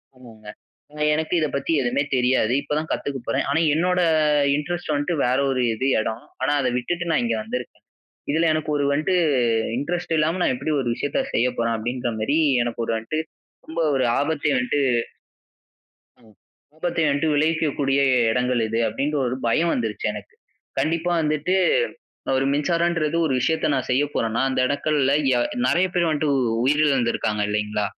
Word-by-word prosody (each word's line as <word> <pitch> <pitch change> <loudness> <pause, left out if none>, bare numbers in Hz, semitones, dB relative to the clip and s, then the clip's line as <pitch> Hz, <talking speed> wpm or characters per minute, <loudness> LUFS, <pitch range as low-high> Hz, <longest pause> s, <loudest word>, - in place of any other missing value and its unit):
ஆமாங்க 115 -4 -15 0.7
எனக்கு 160 +2 -2
இத 160 - +2
பத்தி 140 +3 -2
எதுவுமே 125 +2 0
தெரியாது! 125 -2 +2
இப்ப 150 - -3
தான் 155 +1 -3
கத்துக்க 140 -1 -3
போறேன். - - 0
ஆனா, 145 +3 +2
என்னோட 180 +3 +1 0.6
இன்ட்ரெஸ்ட் 175 +3 -3
வந்துட்டு 145 +4 -1
வேற 125 +1 +1
ஒரு 130 -1 0
இது 110 +4 -3
இடம். 110 0 -3 0.2
ஆனா, 130 +2 +1
அத 130 - 0
விட்டுட்டு 175 +8 -2
நான் 160 - +2
இங்க 115 -1 0
வந்துருக்கேன். 125 +3 -6 0.5
இதுல 160 +2 +2
எனக்கு 155 -1 -2
ஒரு 145 - 0
வந்துட்டு 155 +6 +1 0.6
இன்ட்ரெஸ்ட் 170 +5 -2
இல்லாம 160 +4 +1
நான் - - +2
எப்டி 130 +5 -3
ஒரு 130 - -2
விஷயத்த 145 - -2
செய்ய 120 - +2
போறேன் 115 0 0
அப்படிங்கிற 120 +2 -3
மாரி 140 +8 +1 0.2
எனக்கு 120 0 -3
ஒரு - - -2
வந்துட்டு 115 +8 -3 0.5
ரொம்ப 160 +1 -5 0.2
ஒரு 130 - +1 0.2
ஆபத்த 150 +1 0
வந்துட்டு 125 +3 0 1.4
அ - - -23 0.5
ஆபத்தை 170 0 -1
வந்துட்டு 145 +3 +1
விளைவிக்கக்கூடிய 145 -3 +1 0.3
இடங்கள் 125 0 +1
இது 115 +1 -1
அப்படின்னு 140 +7 -2
ஒரு 125 +1 -2
பயம் 165 +9 +2
வந்துருச்சு 110 -4 -3
எனக்கு. 105 -1 -10 0.5
கண்டிப்பா 165 +2 0
வந்துட்டு 155 +4 0 0.8
ஒரு 135 - +1
மின்சாரம்ன்றது 165 +1 0
ஒரு 145 - 0
விஷயத்த 160 +5 0
நான் 130 - -3
செய்ய 130 +3 +3
போறனா 115 +1 0
அந்த 130 - -1
இடங்கள்ல 140 -1 +1 0.5
நெறைய 180 +2 +2
பேர் 175 -1 +2
வந்துட்டு 150 -1 0
உ - - +2 0.2
உயிரிழந்து 135 -3 +2
இருக்காங்க 105 -1 -1
இல்லைங்களா? 105 0 -1
140 Hz, 160 wpm, -23 LUFS, 125-160 Hz, 1.4 s, செய்ய